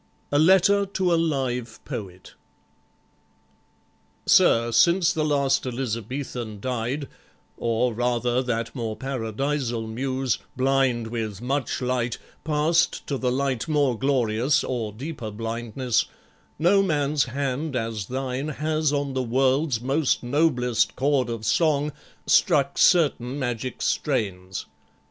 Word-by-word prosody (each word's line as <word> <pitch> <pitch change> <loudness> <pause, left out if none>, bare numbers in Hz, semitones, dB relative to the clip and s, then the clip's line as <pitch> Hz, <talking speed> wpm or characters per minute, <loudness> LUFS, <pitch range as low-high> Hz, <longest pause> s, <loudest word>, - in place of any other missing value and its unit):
A 145 - +3
Letter 190 +4 +5
to 185 -2 0
a - - +5
Live 130 -8 -1
Poet 95 -4 -7 1.9
Sir, 115 0 +5
since 175 +6 +4
the 155 - 0
last 140 -3 +1
Elizabethan 120 -2 -4
died, 130 +4 -3 0.5
Or, 115 +1 0
rather, 120 +1 0
that 115 -2 -2
more 115 -4 -3
Paradisal 125 0 -2
muse, 130 +2 -2 0.2
Blind 130 -3 +2
with 110 -3 -4
much 130 +2 -2
light, 125 -2 -1 0.3
passed 160 +2 +1
to 140 -2 -3
the 125 -1 0
light 135 0 -1
more 145 -5 +2
glorious 130 +2 +1
Or 115 -4 -3
deeper 125 0 -6
blindness, 115 +3 -1 0.5
no 180 +6 +4
man's 150 -5 +1
hand, 135 +3 -3
as 115 -4 -3
thine, 130 +2 -3
Has, 155 0 0
on 140 -2 -1
the 130 - 0
world's 130 +1 +1
most 135 +2 +1
noblest 125 -4 +1
chord 135 -2 +1
of 115 -2 -4
song, 150 +1 +2 0.3
Struck 145 -8 +3
certain 140 -7 +3
magic 125 -2 -3
strains. 95 - -1
130 Hz, 115 wpm, -24 LUFS, 115-145 Hz, 1.9 s, Letter